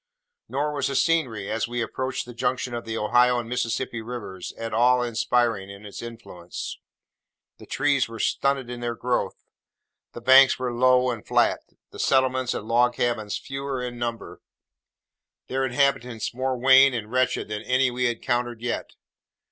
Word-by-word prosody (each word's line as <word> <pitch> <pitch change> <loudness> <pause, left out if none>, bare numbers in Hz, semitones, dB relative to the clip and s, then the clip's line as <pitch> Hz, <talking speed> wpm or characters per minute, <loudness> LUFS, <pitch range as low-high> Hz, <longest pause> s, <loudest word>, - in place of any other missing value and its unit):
Nor 150 +2 -1
was 140 -2 -1
the 135 - -3
scenery, 130 -11 +1
as 110 +1 -1
we 120 0 -4
approached 130 +3 -3
the 120 - -10
junction 125 +1 -2
of 120 0 -4
the 115 0 -4
Ohio 125 +3 +3
and 120 -1 -3
Mississippi 120 -1 -2
rivers, 110 -6 -7
at 115 -1 -6
all 125 +2 +4
inspiriting 115 -3 0
in 100 +1 -11
its 100 - -8
influence. 115 -7 -8 0.8
The - - -13
trees 140 -3 +1
were 115 - -8
stunted 135 +3 0
in 120 0 -6
their 120 -1 -3
growth; 125 +1 -1 0.8
the - - -7
banks 130 +2 +7
were 125 -1 -3
low 125 +1 +4
and 115 -3 -6
flat; - - +2 0.3
the - - -11
settlements 130 -1 +2
and 105 - -5
log 120 +1 +3
cabins 115 -4 -1
fewer 135 -1 -5
in 120 -1 -5
number: 115 -2 -5 1.0
their 135 +1 -2
inhabitants 125 -4 0
more 130 +1 -1
wan 130 +1 +6
and 110 -2 -5
wretched 130 0 +1
than 105 0 -3
any 130 +2 +2
we 125 +1 -1
had 120 -1 +1
encountered 120 -2 -2
yet. 120 0 -3
120 Hz, 165 wpm, -25 LUFS, 115-130 Hz, 1.0 s, banks